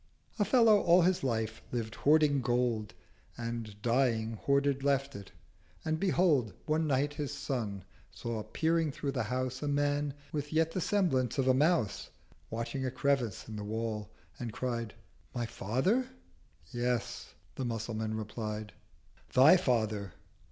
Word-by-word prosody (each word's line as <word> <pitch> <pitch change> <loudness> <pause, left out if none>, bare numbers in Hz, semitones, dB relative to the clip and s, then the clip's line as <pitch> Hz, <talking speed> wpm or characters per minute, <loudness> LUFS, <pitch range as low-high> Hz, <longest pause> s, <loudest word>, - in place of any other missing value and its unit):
A 205 - +3
Fellow 225 -1 +6
all 175 +1 +5
his 180 -2 +2
life 110 -3 -1
lived 115 -3 -3
hoarding 150 -2 +4
Gold, 120 -3 0 0.4
And, 115 -3 -5
dying, 115 -2 +2
hoarded 140 +3 +1
left 140 0 +1
it. 100 -1 -9 0.5
And 160 0 0
behold, 160 - +2
350 - - -4
One 155 +1 +2
Night 145 +1 +1
his 145 -2 -3
Son 120 -9 -3 0.3
saw 110 +2 -4
peering 160 +5 0
through 140 +1 -3
the - - -1
House 130 +3 -2
A 150 - -2
Man, 145 0 0 0.2
with 145 -1 -3
yet 160 +1 +2
the 185 - -2
semblance 160 - +1
of 135 -1 +1
a 130 - +6
Mouse, 140 - +1 0.4
Watching 115 +4 -3
a 130 - 0
crevice 130 -4 0
in 110 - -7
the 105 - -5
Wall—and 110 +1 -5
cried 115 -1 -3 0.4
'My 120 -1 -1
Father?'—'Yes,' 125 - -3 0.2
the 135 - -4
Musulman 110 -1 -3
replied, 110 0 -5 0.6
'Thy 140 +8 +8
Father!' 110 - 0
130 Hz, 140 wpm, -31 LUFS, 110-145 Hz, 0.6 s, Thy